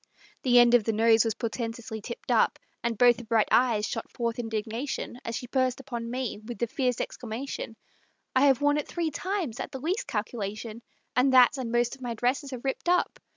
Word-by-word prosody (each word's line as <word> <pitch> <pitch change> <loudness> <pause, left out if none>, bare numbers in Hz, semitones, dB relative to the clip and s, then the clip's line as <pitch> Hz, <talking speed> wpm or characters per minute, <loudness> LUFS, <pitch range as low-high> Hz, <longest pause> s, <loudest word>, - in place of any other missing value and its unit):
The 245 -2 +4
end 240 0 +7
of 240 -3 +6
the 225 - +1
nose 225 0 +5
was 225 -2 -1
portentously 230 -1 -4
tipped 475 - -6
up - - +3 0.3
And 235 -2 -1
both 240 0 +6
the 245 - -8
bright 220 -1 +2
eyes 235 -4 +3
shot 225 - -4
forth 235 0 -3
indignation, 225 +3 -4
As 230 - -4
she 245 - -4
burst 255 0 0
upon 240 -4 -5
me 250 -3 -3
with 235 +1 -7
the 235 - 0
fierce 250 -1 -1
exclamation, 235 0 -5 0.6
"I 270 +2 +5
have 270 -1 +3
worn 290 0 +3
it 295 - -2
three 335 -2 -2
times, 355 - -3
at - - -5
the 265 - -6
least 350 - -2
calculation, 215 +1 -4 0.3
And 255 +2 +4
that 255 +2 +7
and 240 -3 -3
most 240 0 +1
of 265 - -21
my 240 -2 -3
dresses 260 +5 -1
are 255 -2 -6
ripped 270 +5 -2
up!" 360 0 +1
240 Hz, 205 wpm, -28 LUFS, 225-265 Hz, 0.6 s, end